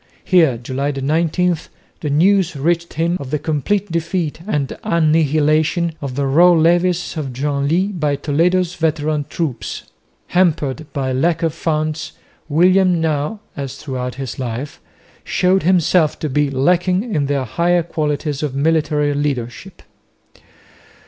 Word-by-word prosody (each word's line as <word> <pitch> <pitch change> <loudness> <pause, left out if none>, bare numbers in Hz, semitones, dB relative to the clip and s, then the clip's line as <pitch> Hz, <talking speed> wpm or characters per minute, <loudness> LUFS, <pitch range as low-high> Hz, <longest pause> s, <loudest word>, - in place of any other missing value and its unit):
Here 160 -10 +3
(July 130 +4 -3
19) 165 +5 +1 0.4
the 150 - -3
news 175 +3 +3
reached 170 +4 -1
him 170 +3 0
of 140 - -7
the 150 - 0
complete 165 +7 -1
defeat 165 -1 -2
and 145 -9 -1
annihilation 155 +1 +2
of 135 -3 -5
the 140 0 0
raw 170 +6 +5
levies 175 +2 +2
of 140 -4 -3
Genlis 145 +8 0
by 150 -2 +1
Toledo's 170 +5 +1
veteran 155 -2 -1
troops. 150 -9 -4 0.5
Hampered 155 -5 +1
by 130 -3 -2
lack 165 +5 +1
of 165 -2 +1
funds 155 -2 -2 0.4
William 180 +3 +4
now, 160 +6 -1
as 135 -2 -5
throughout 125 -3 -5
his 135 -2 -6
life, 130 +3 -5 0.4
showed 185 +1 +2
himself 175 -2 +2
to 155 - -3
be 145 +1 +1
lacking 180 - +1
in 145 -4 0
the 140 -1 0
higher 170 +8 +1
qualities 150 -3 -2
of 145 -3 -3
military 150 0 +1
leadership. 140 +4 -4
155 Hz, 130 wpm, -18 LUFS, 140-175 Hz, 0.5 s, raw